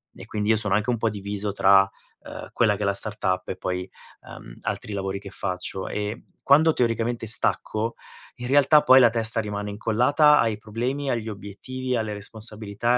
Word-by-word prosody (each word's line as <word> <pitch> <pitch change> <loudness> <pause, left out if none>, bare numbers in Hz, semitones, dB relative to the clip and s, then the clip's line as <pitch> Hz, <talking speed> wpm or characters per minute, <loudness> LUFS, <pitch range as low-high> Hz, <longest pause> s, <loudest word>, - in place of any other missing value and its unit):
e - - -11
quindi 105 0 -3
io 110 - +4
sono 105 -2 0
anche 105 +3 0
un 120 - -1
po' 115 0 0
diviso 100 0 -4
tra, 95 0 +4 0.3
ehm, - - -9
quella 110 -3 +2
che 105 - -5
è - - 0
la 100 - +1
startup 95 -3 -2
e 90 - -4
poi, 90 0 -4 0.4
ehm, - - -12
altri 105 - -4
lavori 95 0 -3
che 100 0 -11
faccio 95 -2 -3
e 105 +2 -5 0.2
quando 155 +3 +5
teoricamente 115 -1 -1
stacco, 110 +1 +1 0.4
in 125 - -8
realtà 145 +2 +5
poi 130 0 +7
la 120 -3 +6
testa 115 0 +2
rimane 105 -1 -5
incollata 125 +8 +3
ai 110 -2 +1
problemi, 125 +7 -4
agli 115 -3 -2
obiettivi, 125 +6 -5
alle 110 -2 -2
responsabilità 110 +2 -3
110 Hz, 180 wpm, -24 LUFS, 100-120 Hz, 0.4 s, poi